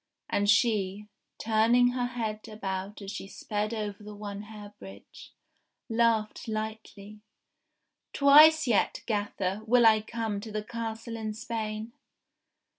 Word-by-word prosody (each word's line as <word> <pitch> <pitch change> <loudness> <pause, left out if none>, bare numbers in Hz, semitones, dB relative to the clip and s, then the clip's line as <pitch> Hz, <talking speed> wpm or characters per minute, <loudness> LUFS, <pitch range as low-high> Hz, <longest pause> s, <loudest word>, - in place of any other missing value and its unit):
And 205 0 +1
she, 210 -2 +2 0.3
turning 230 +3 +3
her 245 0 -1
head 220 -3 -4
about 200 -1 -5
as 195 - -6
she 200 -2 -6
sped 210 +2 -3
over 210 -2 -4
the 210 0 -9
One 205 -1 -6
Hair 210 -1 -11
Bridge, 95 +1 -13 0.6
laughed 225 -1 +1
lightly: 215 -1 -6 0.5
*' - - -54
Twice 305 +3 +7
yet, 230 -6 +1
gafifer, 205 -2 -2
will 240 +1 +5
I 220 -1 +6
come 220 -2 -3
to 220 +1 -8
the 210 0 -3
Castle 230 0 -5
in 215 -1 -4
Spain 220 0 -5
215 Hz, 130 wpm, -28 LUFS, 205-230 Hz, 0.6 s, Twice